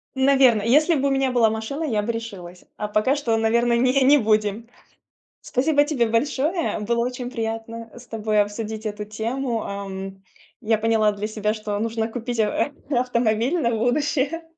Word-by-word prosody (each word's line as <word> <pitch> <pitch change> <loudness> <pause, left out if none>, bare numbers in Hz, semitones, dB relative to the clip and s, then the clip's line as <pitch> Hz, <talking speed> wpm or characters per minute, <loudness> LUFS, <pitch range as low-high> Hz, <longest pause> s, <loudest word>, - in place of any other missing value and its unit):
Наверно, 265 -4 +4
если 305 +8 +4
бы 280 0 +1
у - - 0
меня 270 -1 +1
была 235 -3 +4
машина, 220 +8 -4
я 225 -9 0
бы 230 - -2
решилась, 195 -6 -8
а 210 - -3
пока 215 +7 +1
что, 235 -6 0
наверное, 235 +2 +2
не 255 +3 +3
не 290 +3 +6
будем. 215 -1 0 0.7
Спасибо 285 +3 +2
тебе 260 -7 +1
большое, 285 - 0
было 235 +2 0
очень 250 0 -5
приятно, 225 -1 -5
э, - - -13
с 250 - -14
тобой 215 -1 +1
обсудить 215 +1 -4
эту 210 0 -4
тему, 230 +3 -3
ам. 195 -1 -6 0.4
Я 220 0 +2
поняла 220 -1 +2
для 205 +1 -5
себя, 215 -1 -1
что 210 -1 -4
нужно 225 0 -1
купить 240 0 -5
ав 220 +6 0 0.2
э, 280 - 0
автомобиль 240 +4 +1
на 235 -5 +1
будущее 275 +6 0
230 Hz, 175 wpm, -23 LUFS, 215-260 Hz, 0.7 s, не